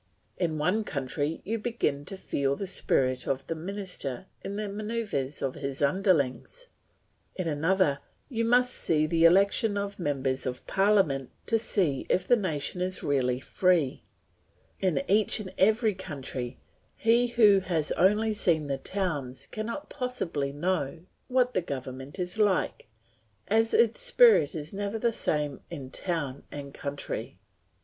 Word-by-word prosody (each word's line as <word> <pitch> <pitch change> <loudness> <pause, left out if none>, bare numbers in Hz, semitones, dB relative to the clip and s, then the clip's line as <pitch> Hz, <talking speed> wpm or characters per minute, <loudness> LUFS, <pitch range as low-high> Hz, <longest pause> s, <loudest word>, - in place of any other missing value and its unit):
In 165 -4 -1
one 180 +9 +1
country 145 -1 -3
you 225 +3 -2
begin 210 -11 -1
to 195 - -4
feel 140 -6 -1
the 195 - -4
spirit 130 -9 +1
of 135 0 -1
the - - -2
minister 180 -5 -5 0.2
in 200 - -4
the 210 0 -3
manoeuvres 205 - -3
of 135 -1 -1
his 140 -1 -5
underlings; 175 - +1 0.7
in 185 -3 -3
another 160 -1 +2 0.3
you 230 -4 -2
must 245 +2 +3
see 155 -2 +1
the 165 +1 +3
election 200 +4 +4
of 200 0 -4
members 135 -5 -1
of 125 0 -5
parliament 190 -10 +2 0.2
to 225 0 +2
see 175 - 0
if 180 +1 +1
the 245 - +6
nation 180 -4 -2
is 185 0 -1
really 130 -3 +1
free; 170 -1 +1 0.8
in 180 -7 +1
each 210 +2 +3
and 190 -3 -7
every 220 +2 +4
country, 135 -8 -5 0.4
he 235 +2 +3
who 215 -5 +5
has 170 -5 -1
only 210 +4 +3
seen 165 -7 +1
the 135 -1 -2
towns 145 -8 -3
cannot 230 +7 -5
possibly 180 - -2
know 160 0 -2 0.3
what 250 -1 +2
the 185 - +1
government 135 -1 -6
is 180 +3 -3
like, 205 -3 +1 0.6
as 225 +2 +2
its 235 -1 +3
spirit 485 - +5
is 155 +2 -6
never 205 +2 -3
the 230 +1 +1
same 150 -8 -1
in 140 -6 -7
town 150 -7 -2
and 140 -1 -8
country. 140 0 -5
180 Hz, 145 wpm, -28 LUFS, 140-210 Hz, 0.8 s, the